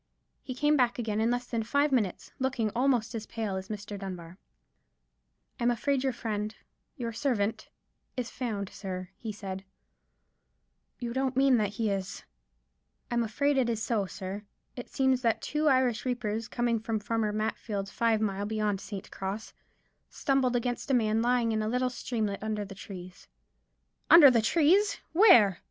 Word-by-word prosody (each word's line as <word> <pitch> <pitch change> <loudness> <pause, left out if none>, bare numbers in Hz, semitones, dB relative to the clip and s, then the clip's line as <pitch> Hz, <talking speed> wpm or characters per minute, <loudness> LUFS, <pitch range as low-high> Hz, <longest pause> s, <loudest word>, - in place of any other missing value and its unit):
He 255 - -6
came 295 +3 +3
back 250 -4 +2
again 220 -3 -1
in 225 - +2
less 245 0 -1
than 230 -2 -2
five 285 +6 +1
minutes, 215 -9 0
looking 255 -5 0
almost 240 -2 +1
as 225 -2 -5
pale 220 -4 -3
as 190 0 -5
Mr. 205 -1 -6
Dunbar. 185 -2 -7 1.2
"I'm 235 - +2
afraid 260 +3 0
your 265 - +1
friend—your 225 +2 -6
servant—is 235 0 -3
found, 210 -6 -3
sir," 185 -2 -6
he 220 +2 -6
said. 195 -2 -6 1.4
"You 235 -1 -4
don't 265 0 -1
mean 270 -2 +5
that 205 -2 0
he 215 -1 0
is——" 195 -1 -4 0.9
"I'm 240 0 +2
afraid 275 +5 +1
it 245 -2 +2
is 225 -2 -1
so, 210 -5 0
sir. 190 +2 -6 0.3
It 245 - -7
seems 265 -1 +2
that 230 -3 +2
two 300 +1 -1
Irish 255 -4 +3
reapers, 230 -3 -2
coming 240 -2 0
from 220 0 -2
Farmer 215 0 -1
Matfield's, 210 -1 -3
five 230 -2 +2
mile 200 -1 -1
beyond 210 -2 -1
St. 195 -2 -7
Cross, 195 +3 -5 0.6
stumbled 265 -3 +1
against 245 +2 -2
a 270 - +4
man 220 -2 +2
lying 240 -1 +2
in 220 -1 0
a 215 - -1
little 250 +1 0
streamlet 220 -5 -3
under 215 -1 -2
the 195 - -9
trees——" 185 -2 -10 0.8
"Under 305 -5 +10
the 235 -2 +3
trees! 340 - +3
Where?" 240 - +7
225 Hz, 160 wpm, -29 LUFS, 210-250 Hz, 1.4 s, Under